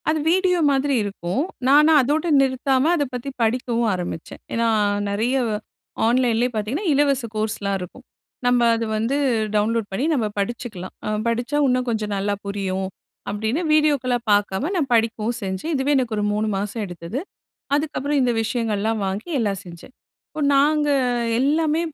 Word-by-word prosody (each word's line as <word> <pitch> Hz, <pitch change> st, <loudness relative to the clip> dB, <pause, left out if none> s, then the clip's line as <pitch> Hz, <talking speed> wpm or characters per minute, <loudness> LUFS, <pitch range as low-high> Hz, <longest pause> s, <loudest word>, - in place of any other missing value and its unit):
அது 310 Hz, 0 st, +1 dB
வீடியோ 365 Hz, 0 st, +3 dB
மாதிரி 275 Hz, +1 st, +1 dB
இருக்கும். 200 Hz, +3 st, -2 dB, 0.3 s
நான 295 Hz, +3 st, +6 dB
அதோட 295 Hz, +6 st, 0 dB, 0.2 s
நிறுத்தாம 265 Hz, 0 st, +1 dB
அத 295 Hz, -, +1 dB
பத்தி 250 Hz, +2 st, -4 dB
படிக்கவும் 235 Hz, 0 st, +1 dB
ஆரம்பிச்சேன். 175 Hz, -3 st, -5 dB
ஏனா, 230 Hz, 0 st, +1 dB, 0.4 s
நெறைய 225 Hz, +6 st, 0 dB, 0.7 s
ஆன்லைன்லேயே 240 Hz, 0 st, +2 dB
பார்த்தீங்கன்னா, 225 Hz, -, -2 dB
இலவச 280 Hz, -2 st, +2 dB
கோர்ஸ்லாம் 210 Hz, -2 st, -1 dB
இருக்கும். 190 Hz, +8 st, -10 dB, 0.4 s
நம்ம 245 Hz, 0 st, +3 dB
அத 230 Hz, -, -2 dB
வந்து 230 Hz, +5 st, 0 dB, 0.4 s
டவுன்லோட் 220 Hz, +1 st, +1 dB
பண்ணி 220 Hz, +9 st, -1 dB
நம்ம 235 Hz, -7 st, +1 dB
படிச்சுக்கலாம். 205 Hz, -3 st, -4 dB, 0.3 s
படிச்சா 240 Hz, +5 st, -1 dB
இன்னும் 255 Hz, 0 st, +1 dB
கொஞ்சம் 215 Hz, -2 st, -2 dB
நல்லா 200 Hz, +1 st, 0 dB
புரியும் 190 Hz, -1 st, -2 dB, 0.4 s
அப்படின்னு, 220 Hz, -, -1 dB
வீடியோக்கள 290 Hz, -5 st, +2 dB, 0.2 s
பார்க்காம 205 Hz, -, +1 dB
நான் 300 Hz, -7 st, 0 dB
படிக்கவும் 225 Hz, 0 st, +1 dB
செஞ்சேன். 190 Hz, -, -3 dB
இதுவே 270 Hz, +1 st, 0 dB
எனக்கு 245 Hz, -4 st, 0 dB
ஒரு 210 Hz, -, 0 dB
3 215 Hz, +1 st, 0 dB
மாசம் 205 Hz, +3 st, -3 dB
எடுத்தது. 175 Hz, +6 st, -6 dB, 0.6 s
அதுக்கப்புறம் 290 Hz, -1 st, 0 dB
இந்த 245 Hz, -1 st, +2 dB
விஷயங்கள்லாம் 220 Hz, -2 st, -1 dB
வாங்கி 195 Hz, -, -4 dB
எல்லாம் 200 Hz, -5 st, -1 dB
செஞ்சேன். 175 Hz, +8 st, -12 dB, 0.3 s
இப்ப 310 Hz, -, -7 dB
நாங்க 295 Hz, +2 st, +3 dB, 0.5 s
எல்லாமே 310 Hz, +3 st, +2 dB
235 Hz, 140 wpm, -22 LUFS, 210-275 Hz, 0.7 s, நான